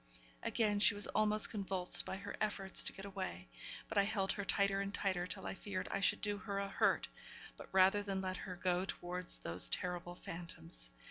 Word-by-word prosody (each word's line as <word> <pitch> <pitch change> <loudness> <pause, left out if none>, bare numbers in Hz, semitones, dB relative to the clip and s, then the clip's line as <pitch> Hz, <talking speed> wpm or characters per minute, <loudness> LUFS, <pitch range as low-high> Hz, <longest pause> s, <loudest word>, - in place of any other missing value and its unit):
Again 210 -3 +1
she 205 - +6
was 205 - +3
almost 215 0 +4
convulsed 190 -3 0
by - - -4
her 195 - -6
efforts 195 -2 +2
to - - +2
get 195 - -9
away; 185 - -5 0.4
but 220 - +1
I - - +5
held 200 -2 0
her 200 - -3
tighter 200 0 +2
and 200 0 -3
tighter, 185 -3 -1
till - - -5
I - - -3
feared 195 -1 -4
I 195 - 0
should 195 - +2
do 205 -1 -1
her 200 -2 -4
a 200 0 -1
hurt; - - +2 0.5
but - - -11
rather 190 +2 +5
that 205 - -7
than 195 -1 -1
let 185 -1 -3
her 185 - -6
go 180 0 0
towards 180 -1 -2
those 85 +2 +3
terrible 175 -1 -1
phantoms. 85 - -4
195 Hz, 205 wpm, -37 LUFS, 180-200 Hz, 0.5 s, she